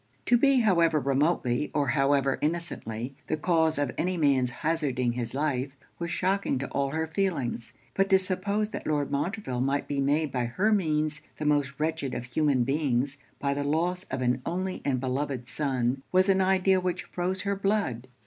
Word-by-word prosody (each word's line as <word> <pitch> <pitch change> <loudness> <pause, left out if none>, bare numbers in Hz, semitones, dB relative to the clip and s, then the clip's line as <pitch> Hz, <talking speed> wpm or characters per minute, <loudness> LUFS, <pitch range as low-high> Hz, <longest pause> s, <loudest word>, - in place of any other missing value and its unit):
To 245 - +4
be, 270 +1 +4
however 170 -7 +3
remotely, 140 -1 +1
or 145 -3 +1
however 135 0 +2
innocently, 135 -7 -3
the 155 - 0
cause 160 -1 +2
of 145 -3 0
any 180 +1 0
man's 135 -5 +3
hazarding 135 -3 0
his 120 0 -3
life, 135 -2 -1 0.3
was 170 0 -3
shocking 190 -3 0
to 135 +1 -3
all 140 0 0
her 160 +3 -1
feelings. 160 -9 -2 0.2
But 195 0 +1
to 190 - +7
suppose 200 +3 -1
that - - -6
Lord 145 -2 0
Montreville 145 - -2
might 140 +2 0
be 140 -1 -1
made 145 +2 +1
by 125 -2 -1
her 190 - +1
means 155 -6 +1 0.2
the 155 - -4
most 145 -2 +1
wretched 155 -4 -1
of - - -3
human 135 0 +1
beings, 135 0 0 0.2
by 140 -1 0
the 145 0 -2
loss 175 +5 0
of 130 -1 -3
an 125 +1 +1
only 185 +2 -3
and 135 -3 0
beloved 130 -1 -2
son, 130 -2 -1
was 185 +1 +4
an 190 0 +4
idea 190 0 +3
which 180 -1 -2
froze 185 +1 -2
her 200 0 -1
blood. 195 - -1
150 Hz, 180 wpm, -28 LUFS, 135-180 Hz, 0.3 s, to